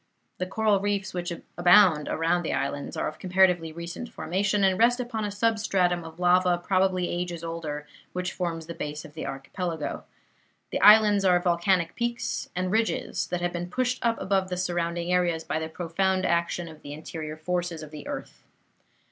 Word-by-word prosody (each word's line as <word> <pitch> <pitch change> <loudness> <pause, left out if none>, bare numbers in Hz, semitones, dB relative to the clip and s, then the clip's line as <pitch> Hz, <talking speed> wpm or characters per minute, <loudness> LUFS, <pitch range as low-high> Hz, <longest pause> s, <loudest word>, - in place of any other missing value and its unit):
The 185 - -1
coral 210 +1 +2
reefs 200 -1 -1
which 175 0 -3 0.3
abound 175 -3 +6
around 165 +2 +1
the 165 - -2
islands 140 +1 -3
are - - 0
of 155 - -7
comparatively 180 -3 +3
recent 170 +8 -7
formation, 200 -1 0
and 190 -1 +3
rest 240 +2 +4
upon 235 -3 -3
a - - -2
substratum 200 -5 +1
of 165 +1 -11
lava 180 0 +4
probably 185 0 +1
ages 175 -1 -3
older, 160 -3 -4 0.3
which 180 +1 -3
forms 165 -3 -3
the 170 - -6
base 150 -1 -5
of 150 - -12
the 160 - -5
archipelago. 160 +4 -4 0.7
The - - -2
islands 210 -1 +7
are 180 -2 +5
volcanic 175 0 +1
peaks 235 0 -2
and 180 0 -1
ridges 220 +2 0
that 180 0 -3
have 175 0 -1
been 175 0 -4
pushed 255 +5 -1
up 230 -1 +1
above 190 -1 0
the 180 - -3
surrounding 175 -1 -1
seas 175 -2 +1
by 160 - -2
the 160 0 -4
profound 185 +3 0
action 170 0 0
of 155 -2 -12
the 145 - -8
interior 155 0 -6
forces 175 0 -2
of 155 - -10
the 150 -2 -9
earth. - - -7
180 Hz, 180 wpm, -27 LUFS, 165-195 Hz, 0.7 s, islands